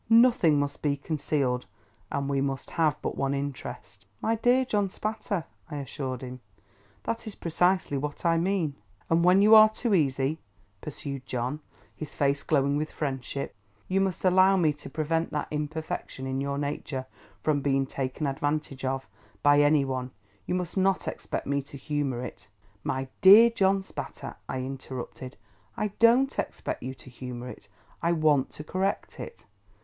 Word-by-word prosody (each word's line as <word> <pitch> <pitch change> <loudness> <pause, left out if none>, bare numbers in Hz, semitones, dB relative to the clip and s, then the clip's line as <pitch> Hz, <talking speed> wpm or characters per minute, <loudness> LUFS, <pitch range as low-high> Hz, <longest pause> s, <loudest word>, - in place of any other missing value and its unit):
Nothing 230 - +6
must 145 0 -2
be 145 -1 +1
concealed, 140 -4 -1 0.4
and 140 -1 -1
we 140 -1 +1
must 135 -1 -3
have 155 -4 +1
but - - -2
one 140 0 0
interest." 125 -8 -6
"My 225 - +1
dear 245 +3 +3
John 205 -5 +1
Spatter," 210 -3 -3 0.3
I 150 - -5
assured 135 -2 -4
him, 125 0 -7 0.6
"that 230 0 -3
is 215 - -6
precisely 175 -3 +1
what 150 +4 -5
I 165 0 +4
mean." 175 -4 0 0.4
"And 165 +1 +4
when 185 +3 +6
you 215 +1 +7
are 215 0 +10
too 220 0 -1
easy," 140 -2 +1 0.4
pursued 140 -3 -6
John, 125 +4 -2 0.4
his 155 -2 -8
face 140 0 +1
glowing 140 -1 +2
with 155 +1 -2
friendship, 140 -1 -3 0.3
"you 190 +1 +2
must 190 -1 -1
allow 185 +1 +6
me 160 -4 +3
to 145 - -10
prevent 160 +1 0
that 150 - -1
imperfection 150 -3 -4
in 130 0 -2
your 140 0 -2
nature 140 -2 -3 0.4
from 150 -2 +2
being 135 -1 +2
taken 135 +2 -3
advantage 145 -1 -2
of, 135 0 -2 0.4
by 145 0 +6
any 145 -1 +4
one; 130 -1 -3 0.4
you 180 - 0
must 180 -2 -3
not 190 0 +2
expect - - -4
me 140 0 0
to 140 +1 -11
humour 140 -4 -2
it—" - - -10 0.4
"My 130 0 -2
dear 215 +5 +9
John 195 -3 +2
Spatter," - - -7
I 130 - -2
interrupted, 130 -1 -6 0.4
"I 210 - 0
don't 245 +4 +5
expect - - -3
you 130 +1 -5
to 130 - -14
humour 125 0 -7
it. - - -11 0.3
I 170 +1 +2
want 155 -4 +3
to 150 - -7
correct 190 +5 -2
it." 470 - -8
145 Hz, 165 wpm, -28 LUFS, 135-185 Hz, 0.6 s, are